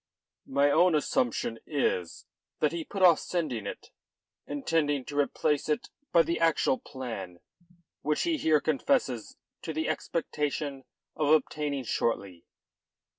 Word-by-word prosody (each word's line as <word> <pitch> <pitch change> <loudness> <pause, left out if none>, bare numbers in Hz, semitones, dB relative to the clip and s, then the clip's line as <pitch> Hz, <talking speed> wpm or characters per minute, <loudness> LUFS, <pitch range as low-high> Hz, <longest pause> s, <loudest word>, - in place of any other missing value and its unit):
"My 140 +1 +3
own 175 +2 +5
assumption 120 -5 0
is 95 - -1 0.3
that 150 - +2
he 170 -1 -3
put 195 +4 -3
off 175 -3 +7
sending 135 - -2
it, - - -8 0.6
intending 145 -1 0
to 145 - -7
replace 145 +1 +1
it 150 - -1 0.2
by 170 - +6
the 170 0 -1
actual 165 -5 +2
plan 110 -9 -7 0.6
which 150 +1 0
he 335 -2 +1
here 155 - +3
confesses 150 - 0 0.2
to 160 - -4
the 160 +1 -1
expectation 145 -4 -2 0.3
of 155 -2 0
obtaining 150 -3 +1
shortly." 100 -7 -2
145 Hz, 125 wpm, -29 LUFS, 130-160 Hz, 0.6 s, off